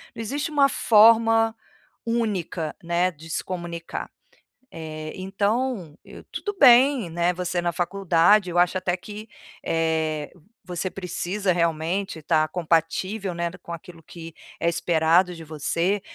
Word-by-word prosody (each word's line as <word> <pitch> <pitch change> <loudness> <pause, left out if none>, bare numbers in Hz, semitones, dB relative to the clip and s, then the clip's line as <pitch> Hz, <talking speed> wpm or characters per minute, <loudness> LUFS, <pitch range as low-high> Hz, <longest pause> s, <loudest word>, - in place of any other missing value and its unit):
Não - - -6
existe 285 +7 -3
uma 285 -2 +4
forma 225 0 +5 0.5
única, 200 -9 -2
né, 175 +2 +1
de 160 0 -14
se - - -2
comunicar. 170 -2 -6 0.6
Eh, 155 -1 -7
então 200 - -2
eu - - -13
tudo 410 -1 -5
bem, 255 -4 +6
né, 170 +2 +1
você 180 0 -2
na 175 - 0
faculdade, 180 +2 +2
eu 175 - -3
acho 180 +1 +3
até 185 -1 -1
que, 210 +3 -10 0.4
eh, 160 -2 -1 0.3
você 180 +1 -4
precisa, 185 +1 -2
realmente, 170 +2 -1
estar 155 0 +2
compatível, 180 +4 -1
né, 170 0 -2
d 180 - -12
com 170 - -12
aquilo 170 0 -10
que 165 0 -11 0.3
é - - 0
esperado 170 +1 +2
de 165 - -10
você, 170 +6 -1
180 Hz, 135 wpm, -24 LUFS, 165-205 Hz, 0.6 s, bem